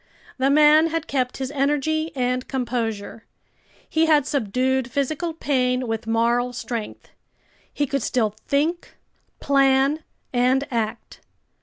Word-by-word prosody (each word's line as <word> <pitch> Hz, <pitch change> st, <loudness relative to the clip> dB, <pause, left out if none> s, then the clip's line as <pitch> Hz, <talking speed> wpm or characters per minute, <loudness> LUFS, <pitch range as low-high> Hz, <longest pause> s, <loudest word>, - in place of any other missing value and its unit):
The 265 Hz, +1 st, +3 dB
man 305 Hz, +2 st, +6 dB
had 330 Hz, -1 st, -2 dB
kept 255 Hz, -2 st, -1 dB
his 265 Hz, 0 st, -4 dB
energy 295 Hz, +3 st, 0 dB
and 250 Hz, 0 st, -1 dB
composure. 230 Hz, -4 st, -3 dB, 0.6 s
He 320 Hz, 0 st, +2 dB
had 300 Hz, -3 st, +4 dB
subdued 260 Hz, -1 st, 0 dB
physical 285 Hz, +6 st, -2 dB
pain 255 Hz, -5 st, 0 dB
with 225 Hz, 0 st, -3 dB
moral 235 Hz, +2 st, +1 dB
strength. 235 Hz, -2 st, -6 dB, 0.6 s
He 290 Hz, -, -1 dB
could 275 Hz, 0 st, -2 dB
still 220 Hz, -3 st, 0 dB
think, 315 Hz, +5 st, -1 dB, 0.4 s
plan, 275 Hz, +2 st, +2 dB, 0.3 s
and 255 Hz, +3 st, +2 dB
act. 230 Hz, -1 st, -3 dB
265 Hz, 120 wpm, -23 LUFS, 245-290 Hz, 0.6 s, man